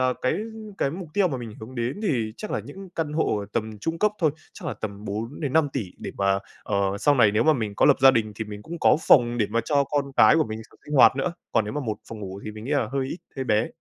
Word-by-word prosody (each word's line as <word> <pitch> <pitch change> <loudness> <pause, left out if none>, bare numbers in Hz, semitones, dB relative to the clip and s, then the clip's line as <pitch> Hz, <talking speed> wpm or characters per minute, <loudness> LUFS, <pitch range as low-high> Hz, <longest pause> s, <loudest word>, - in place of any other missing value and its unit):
ờ, 130 0 +2
cái 130 - +2 0.4
cái 135 - +1
mục 175 -1 -7
tiêu 200 -3 +3
mà 135 - -3
mình 115 -3 -7
hướng 115 +4 -9
đến 120 - -2
thì 115 - 0
chắc 215 - -7
là - - -1
những 195 0 -10
căn 155 -2 -2
hộ 155 -8 +1
ở 100 - -5
tầm 110 -2 -3
trung 165 +9 -3
cấp 210 +3 +3
thôi, 160 -4 +3 0.2
chắc - - -9
là - - -3
tầm 100 -1 -6
4.000.000.000-5.000.000.000 135 +5 -1
để - - -6
mà, 100 0 +2 0.2
ờ, - - -2 0.2
sau 145 +6 +4
này 110 -5 +5
nếu 110 +2 +3
mà 155 - +6
mình 110 -7 -2
có - - +4
lập - - +6
gia 135 0 +9
đình 110 -4 0
thì 110 - -4
mình 105 -1 -8
cũng 170 +6 -7
có - - +5
phòng 120 -2 +5
để 105 - +2
mà 115 +2 +1
cho 140 -2 +2
con 140 -1 -2
cái - - +7
của 160 - +3
mình 110 0 -6
s - - -17 0.2
sinh 150 - -4
hoạt 135 - +7
nữa, 155 +6 -1 0.2
còn 110 -2 +3
nếu 105 - -5
mà 150 - -2
một 110 -5 -3
phòng 110 -2 -8
ngủ 95 0 -7
thì 110 - -4
mình 110 +1 -9
nghĩ 135 - -5
là 140 -7 +1
hơi 135 -1 0
ít, 170 - -5 0.2
hơi 135 - -2
bé. 110 -1 +2
125 Hz, 285 wpm, -25 LUFS, 110-145 Hz, 0.4 s, gia